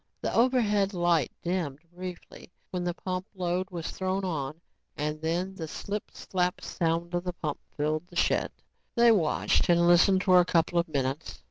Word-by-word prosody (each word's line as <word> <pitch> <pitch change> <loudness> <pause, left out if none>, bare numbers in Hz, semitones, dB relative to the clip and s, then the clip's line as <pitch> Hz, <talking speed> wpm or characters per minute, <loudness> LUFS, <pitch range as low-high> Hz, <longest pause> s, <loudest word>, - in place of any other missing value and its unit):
The - - -1
overhead 210 -5 +3
light 175 -5 +2
dimmed 170 -6 -1 0.2
briefly 180 -1 -8 0.2
when 180 -1 -2
the 175 -1 -2
pump 185 +1 -4
load 180 0 -1
was 170 -3 -5
thrown 190 +1 -2
on 155 -3 -3 0.4
and 150 +1 -2
then 175 +4 -1
the 165 -4 -6
slip 200 +6 -5
slap 180 -1 -1
sound 170 +1 -1
of 175 0 0
the 180 -1 -3
pump 150 -4 -4 0.2
filled 155 +3 -1
the 175 - -16
shed. - - +2 0.4
They 235 0 +6
watched 180 -5 +2
and 170 0 +5
listened 185 +2 +5
for 185 -1 +6
a - - +6
couple 170 0 +2
of 170 - 0
minutes. 140 0 -2
175 Hz, 170 wpm, -28 LUFS, 165-185 Hz, 0.4 s, They